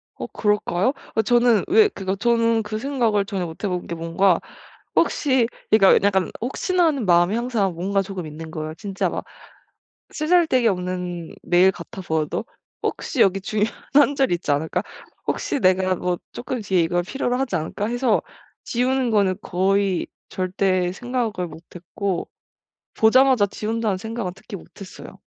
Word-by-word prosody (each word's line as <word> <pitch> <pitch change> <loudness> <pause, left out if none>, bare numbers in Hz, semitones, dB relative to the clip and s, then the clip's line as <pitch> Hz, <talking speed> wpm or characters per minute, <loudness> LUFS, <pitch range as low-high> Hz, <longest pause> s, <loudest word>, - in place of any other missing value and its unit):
어 - - -5
그럴까요? 210 +2 +1 0.2
어 220 - +3
저는 240 -1 +3
왜 425 +3 +6
그러니까 195 - -4
저는 230 -1 +2
그 215 +1 -4
생각을 230 -5 +1
전혀 195 -3 -3
못 160 -1 -10
해 - - +1
본 180 -1 -3
게 170 - -4
뭔가 170 +2 +2 0.6
혹시 260 -5 +2 0.2
그러니까 200 -1 +6
약간 190 -2 +1
혹시나 350 - +1
하는 280 -8 0
마음이 175 +2 +4
항상 230 -6 0
뭔가 195 +4 0
조금 190 -4 -6
있는 160 +1 -8
거에요. 155 0 -5
진짜 195 +2 -2
막 - - -4 0.9
쓰잘데기 310 -7 +3
없는 180 -3 -3
메일 180 +2 +4
같아 180 +1 -9
보여도 160 -3 -2 0.4
'혹시 275 - -3
여기 195 0 +3
중요한 210 +2 -1 0.2
한 285 0 +5
줄이 265 -10 +2
있지 170 -4 -2
않을까? 150 +3 0 0.5
혹시 - - -1
내가 185 -2 +2 0.3
조금 250 0 -4
뒤에 190 -4 +1
이걸 175 +2 0
필요로 250 +3 -2
하지 255 -8 -1
않을까?' 165 +6 -3
해서 240 -1 +1 0.4
지우는 255 +1 0
거는 200 -3 +3
거의 190 0 +1 0.2
절대 185 -1 0
생각을 235 -5 -2
못했고 175 +3 -5 0.7
'보자마자 250 0 +5
지운다.'는 215 0 -2
생각은 220 -2 -4
특히 200 +2 -9
못했어요. 190 +2 -12
200 Hz, 325 characters per minute, -22 LUFS, 180-240 Hz, 0.9 s, 왜